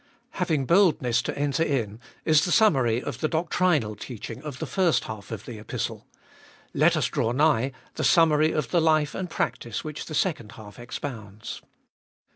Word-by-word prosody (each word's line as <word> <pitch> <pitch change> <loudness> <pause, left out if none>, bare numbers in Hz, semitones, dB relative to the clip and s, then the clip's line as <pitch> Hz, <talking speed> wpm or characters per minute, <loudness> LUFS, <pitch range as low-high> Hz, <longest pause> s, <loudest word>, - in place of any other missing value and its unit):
1. - - -14
Having 160 -7 +1
boldness 155 - +3
to - - -4
enter 145 +2 0
in 115 -9 -1 0.3
is 155 -1 +5
the 175 - -1
summary 130 - +3
of 125 - -5
the 155 - +1
doctrinal 160 -8 +1
teaching 115 0 -8
of 150 -3 -7
the - - -4
first 185 -4 +1
half 105 -3 -8
of 110 -5 -6
the 115 -3 -8
Epistle; 105 - -5 0.7
let - - +3
us - - +1
draw 115 - 0
nigh, 135 -2 +2 0.2
the - - -3
summary 155 -2 +4
of 150 -6 -2
the 170 - +3
life 155 -2 +2
and 185 -2 -4
practice 115 -8 -3
which 155 -1 -6
the 155 - -5
second 145 - -1
half 105 0 -12
expounds. 115 -4 -7
145 Hz, 175 wpm, -26 LUFS, 115-160 Hz, 0.7 s, is